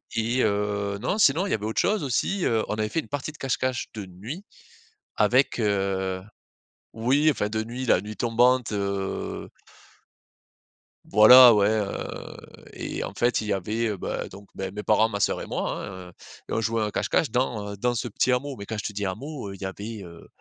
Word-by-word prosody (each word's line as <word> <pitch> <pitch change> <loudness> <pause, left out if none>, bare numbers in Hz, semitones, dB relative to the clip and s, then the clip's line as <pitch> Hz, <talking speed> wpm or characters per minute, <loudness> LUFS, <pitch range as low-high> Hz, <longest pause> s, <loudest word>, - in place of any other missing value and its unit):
Et 115 +3 +1
heu, 100 -1 0
non 195 - -1
sinon 180 -2 +4
il - - -4
y - - +2
avait 105 - -1
autre 110 - 0
chose 210 -4 +1
aussi, 175 +8 0
heu. 110 -2 +2
On - - -2
avait 110 0 -1
fait 165 - -1
une - - -6
partie 145 +2 -3
de 150 - -17
cache-cache 130 -1 -1
de 105 -3 -6
nuit 110 - -8 0.7
avec, 125 +4 +3
heu 95 -3 0 0.7
oui 135 +7 +3
enfin 105 -8 0
de 110 0 -1
nuit, 125 +3 -5
la 90 - +4
nuit 105 +2 -7
tombante, 120 +2 +2
heu 100 -1 -3 1.6
Voilà, 120 +4 +10
ouais, 105 -1 +4
heu. 105 -2 -3 0.4
Et - - -4
en - - -6
fait 120 -1 +1
il 105 - -5
y - - +1
avait, 110 +4 -1
heu, 105 - -3
bah, - - -4
donc, 100 +1 -13
beh, 95 -1 -4
mes 105 +1 -5
parents 110 +1 +3
ma 100 -2 -4
sœur - - +1
et - - -5
moi, - - -3
hein, 95 -2 -9
heu. - - -15 0.4
Et - - -3
on 115 - +1
jouait 115 0 0
un 105 - 0
cache-cache 140 +8 0
dans, 110 -4 -1
heu, - - -9
dans 120 +4 0
ce 120 +1 -2
petit 125 +4 +1
hameau, 135 +2 -1
mais 100 - -7
quand 110 - -5
je 105 - -4
te 105 - -3
dis 100 0 -3
hameau, 125 +4 -5
heu, 95 - -7
il 100 - -15
y - - -3
avait, 105 +3 -6
heu 85 -2 -12
110 Hz, 215 wpm, -25 LUFS, 100-125 Hz, 1.6 s, Voilà